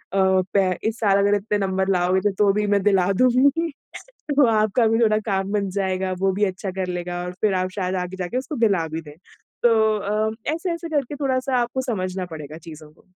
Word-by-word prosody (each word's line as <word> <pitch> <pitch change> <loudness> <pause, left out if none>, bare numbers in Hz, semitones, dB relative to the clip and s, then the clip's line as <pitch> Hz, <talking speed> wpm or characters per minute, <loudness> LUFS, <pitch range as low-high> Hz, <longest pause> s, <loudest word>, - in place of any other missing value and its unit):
पै 190 0 +2 0.2
इस 225 - -8
साल 200 -3 +3
अगर 200 +1 +3
इतने 210 +1 -1
नंबर 190 0 0
लाओगे 185 +3 +1
तो 205 -1 +5
भी 210 0 0
मैं 200 -1 +2
दिला 195 -2 +3
दूँगी। 275 +7 +3 0.7
तो 280 -2 +6
आपका 215 +2 +2
भी 225 +1 +2
थोड़ा 215 -2 +3
काम 195 -1 -1
बन 200 -2 0
जाएगा, 190 -1 -1
वो 195 0 +2
भी 205 +2 +1
अच्छा 190 0 -4
कर 185 -1 -3
लेगा 175 0 -4
और 180 - -5
फिर 210 -3 +2
आप 185 0 0
शायद 185 -1 -2
आगे 185 +1 -7
जाके 185 +7 -3
उसको 270 +3 -4
दिला 175 -6 +1
भी 160 +1 -5
दें। 150 -1 -13 0.5
तो 240 - +6 0.3
अ, 215 +2 -1 0.2
ऐसे-ऐसे 335 0 -4
करके 285 0 -1
थोड़ा-सा 265 -2 0
आपको 240 +2 -2
समझना 185 -2 -3
पड़ेगा 155 +1 -8
चीज़ों 155 -1 -12
को। - - -25
195 Hz, 200 wpm, -22 LUFS, 185-225 Hz, 0.7 s, तो